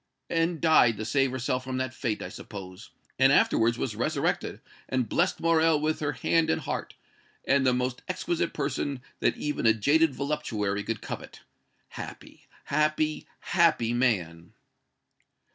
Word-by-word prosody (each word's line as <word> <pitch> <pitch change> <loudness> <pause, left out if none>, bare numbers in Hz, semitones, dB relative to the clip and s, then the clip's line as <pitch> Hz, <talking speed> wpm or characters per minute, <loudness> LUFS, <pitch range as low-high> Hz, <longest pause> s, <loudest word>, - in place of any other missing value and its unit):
"And 165 0 +1
died 130 -9 +5
to 110 - -4
save 135 +3 +2
herself 130 0 -2
from 130 0 -4
that 130 0 -2
fate, 110 -4 -3
I - - -6
suppose 95 0 -9 0.3
and 135 +1 +6
afterwards 115 -4 +3
was - - -3
resurrected - - -1 0.3
and 130 -3 0
blessed 175 - +1
Morrel 165 -2 +3
with 155 +1 0
her 145 -1 -1
hand 165 -1 +1
and 160 0 +1
heart, - - -4 0.5
and 135 -1 +3
the - - +5
most 125 0 -2
exquisite 175 -2 -1
person 140 -2 -3 0.2
that - - +1
even 150 -5 -1
a 110 - +5
jaded 145 +6 +3
voluptuary 115 -8 -2
could 115 0 -4
covet. - - -7 0.5
Happy - - -10 0.2
happy 155 +1 0
happy 160 -10 +2
man!" 90 -10 -1
135 Hz, 145 wpm, -27 LUFS, 115-155 Hz, 0.5 s, and